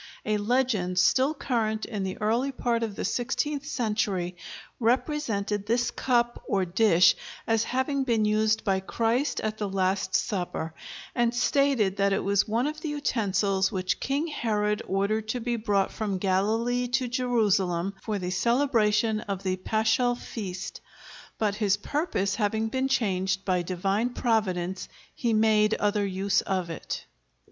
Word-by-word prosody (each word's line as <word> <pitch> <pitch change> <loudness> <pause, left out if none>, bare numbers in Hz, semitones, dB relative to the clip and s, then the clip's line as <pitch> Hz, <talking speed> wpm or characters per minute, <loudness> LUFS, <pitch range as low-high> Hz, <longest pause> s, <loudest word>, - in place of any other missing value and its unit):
A 215 0 +1
legend 210 -5 0
still 260 - +3
current 220 -6 -1
in 210 -4 -4
the 190 -1 -4
early 235 +6 +1
part 240 -3 -1
of 220 -3 -3
the - - -3
sixteenth 280 +4 -1
century 210 - -1 0.4
represented 225 -5 0
this 240 +2 +1
cup, 240 -2 0
or 195 -2 +1
dish, 180 -1 +4 0.3
as 225 -1 +1
having 265 +2 0
been 230 -4 +1
used 215 +1 +2
by 195 -3 +1
Christ 230 +8 0
at 215 0 -3
the 205 -2 -2
Last 190 0 0
Supper, 175 -6 -2 0.4
and 240 -1 +1
stated 245 -6 +2
that 200 0 +2
it 195 - 0
was 200 +2 +2
one 230 +4 +1
of 305 +1 -3
the 315 - -3
utensils 200 -9 0
which 185 -1 -1
King 280 +4 -1
Herod 210 -8 -1
ordered 205 +3 0
to 245 +3 -2
be 240 0 -1
brought 205 -3 +1
from 205 -3 -2
Galilee 220 +6 +1
to 245 +1 0
Jerusalem 205 -7 +1
for 215 -2 -2
the 180 -2 -3
celebration 225 -1 +2
of 200 -2 -5
the 185 -1 0
paschal 220 +5 +1
feast; 195 -6 -6 0.6
but 210 -2 +1
his 205 -1 +1
purpose 205 - -1
having 220 +1 0
been 260 +3 0
changed 195 -6 0
by 185 -2 +1
Divine 195 +7 -1
Providence, 190 -6 -1 0.2
he 235 - -1
made 215 -1 +3
other 205 -1 0
use 195 +1 +1
of 185 -3 -2
it. 165 - -5
215 Hz, 150 wpm, -27 LUFS, 195-240 Hz, 0.6 s, dish